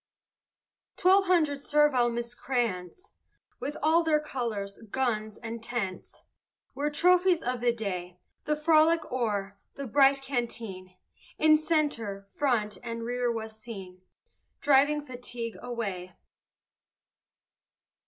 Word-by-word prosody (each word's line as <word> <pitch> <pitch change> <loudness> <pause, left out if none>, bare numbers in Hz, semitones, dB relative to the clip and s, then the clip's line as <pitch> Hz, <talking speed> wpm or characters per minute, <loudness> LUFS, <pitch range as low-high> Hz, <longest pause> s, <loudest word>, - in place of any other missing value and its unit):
Twelve 385 +1 +5
hundred 310 -6 +2
servile 295 -5 +3
miscreants, 235 - -3 0.5
With 295 - -4
all 320 +2 +5
their 315 -2 +2
colors, 230 -9 -4
guns, 220 -4 -1
and 230 -1 -7
tents, 225 -6 -5 0.5
Were 285 +3 -1
trophies 360 +2 +3
of 250 0 -1
the 240 0 +3
day. 180 -6 -5 0.3
The 300 - +1
frolic 315 +1 +4
o'er, 205 -5 -2 0.2
the 280 - -5
bright 275 +2 +4
canteen, 225 -8 -4 0.4
In 310 0 +6
centre, 290 -11 -1
front, 215 -9 0
and 230 -1 -5
rear 245 0 0
was 220 -1 -6
seen 190 -5 -9 0.6
Driving 290 +1 +4
fatigue 245 -4 -7
away. 200 -7 -4
245 Hz, 105 wpm, -28 LUFS, 220-295 Hz, 0.6 s, In